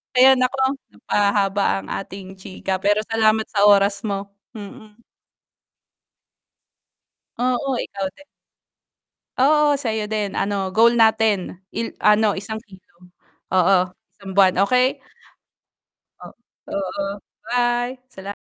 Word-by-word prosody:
Ayun, 260 +1 +6
naku, 255 +1 +1 0.4
napahaba 200 -1 0 0.2
ang 95 - -13
ating 190 -1 -7
chika 190 0 -4
pero 205 +2 +1
salamat 220 -1 +2
sa 205 -1 +3
oras 200 0 +4
mo, 200 0 -4 0.2
mm. 210 0 -11 2.4
Oo, 250 +2 0
ikaw 195 -1 -5
din. 290 - -16 1.1
Oo, 290 +1 +3
sa 230 -5 -2
'yo 215 -1 -3
din, 210 -2 -2
ano, 195 -1 -2
goal 235 +2 +4
natin 220 -5 +2
il 230 - -4
ano 210 0 +4
isang 205 +3 -5
kilo, 190 -3 -16 0.7
oo, 185 +1 +4 0.4
isang 195 -2 -9
buwan, 190 -2 +4
okey. 250 +3 +2 1.2
O - - -10 0.5
oo. 200 +1 -3 0.3
Bye, 245 +1 0
salam 200 -3 -8
210 Hz, 110 wpm, -21 LUFS, 195-230 Hz, 2.4 s, Ayun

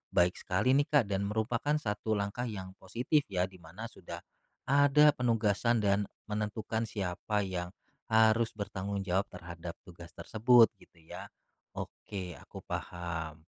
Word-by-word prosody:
baik 90 +1 +4
sekali 100 +7 +1
nih 145 +1 +3
Kak 145 -4 +4
dan 100 +1 0
merupakan 115 +7 0
satu 110 -5 -1
langkah 105 +5 -2
yang 95 -4 -6
positif 140 +5 +1
ya 90 -3 0
di 95 -1 -16
mana 90 +6 -10
sudah 85 -6 -9 0.5
ada 145 +2 +6
penugasan 115 -1 +2
dan 100 0 +2 0.2
menentukan 105 +1 -2
siapa 100 +1 -2
yang 90 -2 -3 0.4
harus 110 +1 +4
bertanggung 100 -1 -3
jawab 95 +2 0
terhadap 85 -1 -8
tugas 85 -2 -12
tersebut, 115 +1 +5
gitu 85 - -21
ya. - - -8 0.5
Oke, 95 -3 -6
aku - - -11
paham. 80 -2 -5
105 Hz, 135 wpm, -31 LUFS, 90-115 Hz, 0.5 s, ada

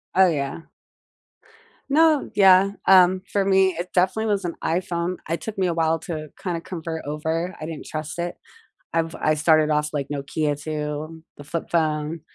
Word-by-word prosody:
Oh, 190 0 +6
yeah. 145 +1 -3 1.3
No, 310 0 +4
yeah, 195 -1 +6
um, 185 0 +6
for 200 -1 +1
me, 190 -1 +4
it 180 +1 -4
definitely 190 +5 +2
was 205 -2 0
an 175 -1 -3
iPhone. 175 +1 -1
It 165 - -1
took 220 -2 -7
me 185 -1 +1
a 170 - 0
while 165 0 +1
to 155 -1 -6
kinda 175 -3 -3
convert 165 -2 -6
over, 160 +5 -2
I - - -4
didn't 160 -1 -7
trust 155 +2 -5
it. 175 0 -3 0.6
I've 165 0 0
I 155 0 +1
started 155 0 +3
off, 150 0 +1
like, 140 -2 -2
Nokia 145 +1 -2
too, 155 +1 -5
the 145 - -10
flip 160 +3 -4
phone, 155 -1 0
165 Hz, 170 wpm, -23 LUFS, 155-185 Hz, 1.3 s, Oh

